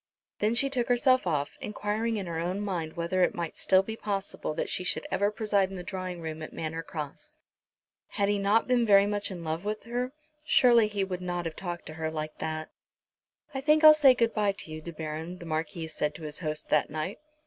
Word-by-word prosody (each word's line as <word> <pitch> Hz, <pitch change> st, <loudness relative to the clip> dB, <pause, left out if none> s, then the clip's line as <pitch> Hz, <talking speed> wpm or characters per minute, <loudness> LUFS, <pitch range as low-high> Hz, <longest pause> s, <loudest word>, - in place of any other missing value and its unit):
Then 215 Hz, +2 st, +2 dB
she 275 Hz, +3 st, +3 dB
took 250 Hz, -3 st, -1 dB
herself 255 Hz, -2 st, +4 dB
off, 145 Hz, -4 st, -1 dB
enquiring 215 Hz, +2 st, -2 dB
in 200 Hz, -, -3 dB
her 165 Hz, -2 st, -3 dB
own 180 Hz, +4 st, -2 dB
mind 175 Hz, -6 st, -3 dB
whether 170 Hz, +2 st, -1 dB
it 180 Hz, -, +3 dB
might 170 Hz, -2 st, -4 dB
still 190 Hz, 0 st, +4 dB
be 220 Hz, +3 st, -5 dB
possible 200 Hz, -7 st, -3 dB
that -, -, -1 dB
she 185 Hz, -, -2 dB
should -, -, 0 dB
ever 200 Hz, +1 st, +2 dB
preside 210 Hz, -3 st, +1 dB
in 195 Hz, -, -7 dB
the 180 Hz, -, -6 dB
drawing 185 Hz, -2 st, -5 dB
room 160 Hz, -1 st, -5 dB
at 155 Hz, -, -7 dB
Manor 160 Hz, +1 st, -3 dB
Cross. 165 Hz, -, -7 dB, 0.7 s
Had 200 Hz, -2 st, 0 dB
he 205 Hz, 0 st, +1 dB
not 205 Hz, +3 st, +3 dB
been 250 Hz, -1 st, +3 dB
very 200 Hz, -3 st, +6 dB
much 205 Hz, 0 st, -1 dB
in 180 Hz, -3 st, -7 dB
love 160 Hz, +2 st, -3 dB
with 210 Hz, +1 st, -3 dB
her, 245 Hz, +2 st, -2 dB, 0.3 s
surely 240 Hz, -7 st, +5 dB
he 205 Hz, -2 st, -1 dB
would 185 Hz, -1 st, -4 dB
not 175 Hz, -1 st, -3 dB
have 165 Hz, -1 st, -4 dB
talked 175 Hz, -2 st, -5 dB
to 155 Hz, -, -7 dB
her 160 Hz, -, 0 dB
like 155 Hz, -1 st, -5 dB
that. 155 Hz, 0 st, -4 dB, 0.8 s
"I 265 Hz, -, -3 dB
think 305 Hz, +2 st, +4 dB
I'll 310 Hz, 0 st, +11 dB
say 280 Hz, -4 st, +6 dB
good 230 Hz, -2 st, +2 dB
bye 205 Hz, -2 st, +2 dB
to 165 Hz, -, -8 dB
you, 155 Hz, 0 st, -6 dB
De 170 Hz, -, -7 dB
Baron," 160 Hz, +2 st, -5 dB
the 175 Hz, -, -10 dB
Marquis 160 Hz, 0 st, -3 dB
said 150 Hz, -1 st, -2 dB
to -, -, -10 dB
his 150 Hz, -1 st, -4 dB
host, 155 Hz, -3 st, -3 dB
that 150 Hz, -, +3 dB
night. 155 Hz, +6 st, -4 dB
185 Hz, 225 wpm, -29 LUFS, 160-215 Hz, 0.8 s, I'll